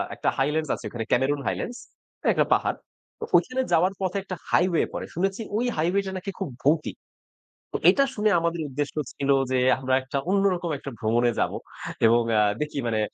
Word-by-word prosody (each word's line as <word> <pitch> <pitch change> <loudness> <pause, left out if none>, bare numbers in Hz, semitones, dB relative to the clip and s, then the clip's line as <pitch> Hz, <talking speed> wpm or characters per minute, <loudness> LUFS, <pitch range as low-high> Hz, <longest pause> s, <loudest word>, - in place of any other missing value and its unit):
একটা - - 0
হাইল্যান্ডস 150 +2 0
আছে - - -11
ওখানে। 115 +1 -4
ক্যামেরুন 140 +3 +2
হাইল্যান্ডস 245 +1 -3 0.5
একটা - - +2
পাহাড়। - - +1 0.4
তো - - -5
ঐখানে 255 +1 +3
যাওয়ার 180 +4 +3
পথে 185 +1 -1
একটা 185 -1 -5
হাইওয়ে 180 -2 +3
পড়ে। - - -4
শুনেছি 195 +5 -1 0.2
ওই 240 - 0
হাইওয়েটা 190 +5 +1
নাকি 195 +2 -5
খুব 195 - -3
ভৌতিক। 150 +2 +2 0.8
তো - - -1
এটা 275 - +4
শুনে 215 0 +2
আমাদের 170 0 -1
উদ্দেশ্য 145 +2 -3 0.2
ছিল 140 0 -3 0.2
যে 130 - +2 0.2
আমরা 130 0 -1
একটা 130 +2 -4
অন্যরকম 190 -3 +1
একটা 140 - -7
ভ্রমণে 120 +2 +2
যাবো। - - 0 0.5
এবং 115 +1 +5 0.2
আ - - +5 0.2
দেখি 150 -1 -3
মানে 110 -2 0
160 Hz, 175 wpm, -25 LUFS, 135-195 Hz, 0.8 s, এবং